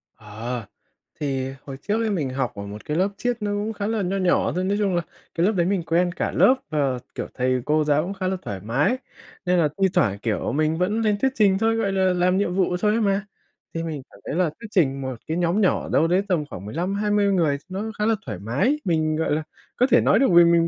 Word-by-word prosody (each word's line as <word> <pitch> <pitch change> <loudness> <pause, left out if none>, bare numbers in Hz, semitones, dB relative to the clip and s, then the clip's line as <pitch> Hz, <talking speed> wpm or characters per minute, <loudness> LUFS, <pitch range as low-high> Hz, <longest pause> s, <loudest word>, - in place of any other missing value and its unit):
Ờ. 110 +2 -6 0.5
Thì 135 -2 -2
hồi 135 -2 -7
trước 220 +2 +1
ấy 220 - 0
mình 155 -10 -1
học 130 -2 -2
ở 100 - -6
một 105 +1 -9
cái 150 +2 -2
lớp 190 +2 +2
triết 245 -1 -1
nó 205 0 -1 0.2
khá 205 0 -2
là 220 -2 0
nho 190 +2 -1
nhỏ 185 -2 +2
thôi, 185 - 0
nói 200 +2 0
chung 195 -4 +1
là 175 - +2 0.3
cái 170 +2 +2
lớp 215 - +4
đấy 175 -5 +1
mình 190 -3 0
quen 175 +2 +1
cả - - -2
lớp 260 - +5 0.2
và, 140 -5 0 0.2
kiểu, - - -4
thầy 130 0 0
cô 155 +1 +2
giáo 150 +1 +2
cũng 195 +3 -4
khá 185 -1 -3
là 190 0 -1
thoải 100 -2 -5
mái 145 - +1 0.5
nên 180 0 +3
là 150 -3 +3
thi 190 - +6
thoảng, 100 - +2
kiểu, 110 0 -1
mình 155 +3 +1
vẫn 210 +5 0
lên 210 -2 +2
thuyết 265 -1 +2
trình 195 -3 +4
thôi, 225 +1 +2
gọi 210 -4 0
là, 190 -1 +2
làm 180 +1 +2
nhiệm 185 -3 0
vụ 180 -2 +1
thôi 210 -1 +3
ấy 225 +1 +1
mà. 200 0 +1 0.5
Thì 165 0 -3
mình 155 -4 -4
cảm 100 - -17
thấy - - -3
là 180 -3 +2
thuyết 230 - -8
trình 135 -8 +2
một 130 -1 -4
cái 160 +2 -1
nhóm 175 +4 +1
nhỏ 185 - +1
đâu 165 - +3
đấy 180 +3 +3
tầm 165 -6 0
khoảng 95 +2 -8
15, 175 - -2
20 205 0 +2
người 155 -6 +2
nó 205 +4 -4
khá 210 - +1
là 225 0 +3
thoải 105 -6 -5
mái, 140 - 0
mình, 155 -3 +1
gọi 160 - -1
là, 155 +1 0 0.3
có 250 - +3
thể 245 - +6
nói 205 - +4
được 270 - +4
vì 175 - +9
mình 170 0 +4
175 Hz, 260 wpm, -23 LUFS, 145-200 Hz, 0.5 s, vì